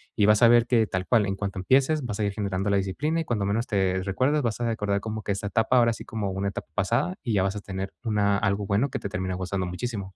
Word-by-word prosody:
y 105 - +3
vas 105 0 +4
a 120 - +8
ver 120 0 +5
que 115 -3 +2
tal 95 -1 -2
cual, 105 +2 +3
en 95 - -1
cuanto 100 -1 -4
empieces, 135 +9 +2
vas 110 -4 -4
a - - +1
ir 100 -1 -1
generando 100 -1 -2
la 100 - +3
disciplina 130 - -1
y 165 - -2
cuando 110 -7 -1
menos 110 +4 -1
te 95 -3 +1
recuerdas, 130 +10 +1
vas 115 -4 -2
a 120 - -1
recordar 105 -3 0
como 110 +1 -5
que 100 - -1
esa 100 +1 -4
etapa, 110 +5 +2
ahora 115 -1 +4
sí, 110 - -9
como 105 -3 -3
una 95 +1 -2
etapa 100 - -7
pasada 115 - 0
y 120 - -1
ya 95 -2 +2
vas 95 +1 -1
a 105 - -5
tener 95 -1 -5
una 105 -3 +2
algo 100 0 0
bueno 105 +8 +1
que - - -3
te - - -4
termine 95 0 -3
gustando 95 0 -3
muchísimo. 95 0 -5
105 Hz, 280 wpm, -26 LUFS, 95-115 Hz, -, a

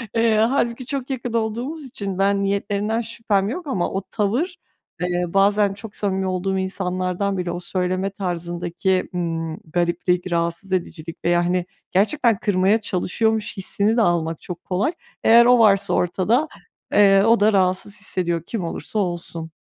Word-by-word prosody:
Eee, 230 -1 +3
hâlbuki 235 +1 +1
çok 270 -1 -4
yakın 245 -3 -4
olduğumuz 235 +8 -2
için 200 -6 -5
ben 200 0 +2
niyetlerinden 200 +3 -1
şüphem 220 -3 -1
yok 320 +4 -5
ama 185 -10 -1
o 195 - -2
tavır, 245 - -1 0.4
eee, 180 0 0
bazen 200 +1 +3
çok 205 +1 -10
samimi 190 -2 -1
olduğum 185 +1 -1
insanlardan 185 +1 -2
bile, 180 -1 -2
o 175 - -4
söyleme 185 +1 -1
tarzındaki, 175 0 -2
ımm, 165 -2 -2 0.2
gariplik, 175 +1 0
rahatsız 170 +3 -2
edicilik 165 -2 -4
veya 175 0 +3
hani 180 0 0 0.3
gerçekten 225 +4 +3
kırmaya 195 +1 +2
çalışıyormuş 215 +3 -1
hissini 205 +3 +1
de - - +4
almak 165 -5 0
çok 175 -1 -8
kolay. 195 - 0 0.3
Eğer 235 +1 +7
o 245 0 +6
varsa 200 -3 +4
ortada, 200 - +1 0.5
eee, 195 -1 +6
o 225 0 +4
da 210 +1 +4
rahatsız 190 +2 +1
hissediyor, 175 -4 -1
kim 225 -6 -3
olursa 210 +5 -4
olsun. 170 -3 -4
195 Hz, 150 wpm, -22 LUFS, 180-220 Hz, 0.5 s, Eğer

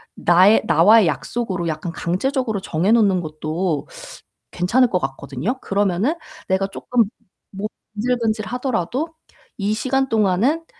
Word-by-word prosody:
나의 185 +5 +5
나와의 180 +5 +6
약속으로 180 - -2
약간 160 +2 -4
강제적으로 220 +5 -1
정해 185 +3 0
놓는 200 -6 +4
것도 155 +1 -3 0.6
괜찮을 230 +8 +2
것 180 - +1
같거든요. 140 - -4
그러면은 200 - 0 0.3
'내가 190 +1 +1
쪼끔 230 +3 0 0.5
몸이 200 +2 -4 0.3
근질근질하더라도 240 - -1 0.5
이 205 +1 0
시간 265 +4 0
동안은 225 - +1
200 Hz, 300 characters per minute, -21 LUFS, 175-240 Hz, 0.6 s, 나와의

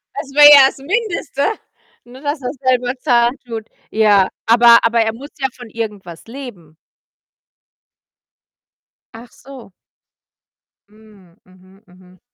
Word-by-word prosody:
das 275 -3 -8
wäre 295 +1 +8
ja 275 -2 +8
das - - -7
Mindeste, 340 - -4 0.6
nur 250 +3 -15
das 290 0 -4
er's 250 +3 -6
selber 250 -1 0
zahlen 240 -2 +1
tut. 225 -2 -8 0.2
Ja, 205 -3 +2 0.2
aber 235 +1 +6
aber 230 0 +1
er 220 0 -1
muss 275 +5 -12
ja 265 - -1
von 245 -2 -12
irgendwas 205 -7 -8
leben. 215 - -12 2.4
Ach 235 +1 -14
so. 260 -6 -15 1.2
Mhm, 210 -5 -22
mhm, 185 +2 -23
mhm. 180 0 -22
235 Hz, 120 wpm, -16 LUFS, 205-265 Hz, 2.4 s, wäre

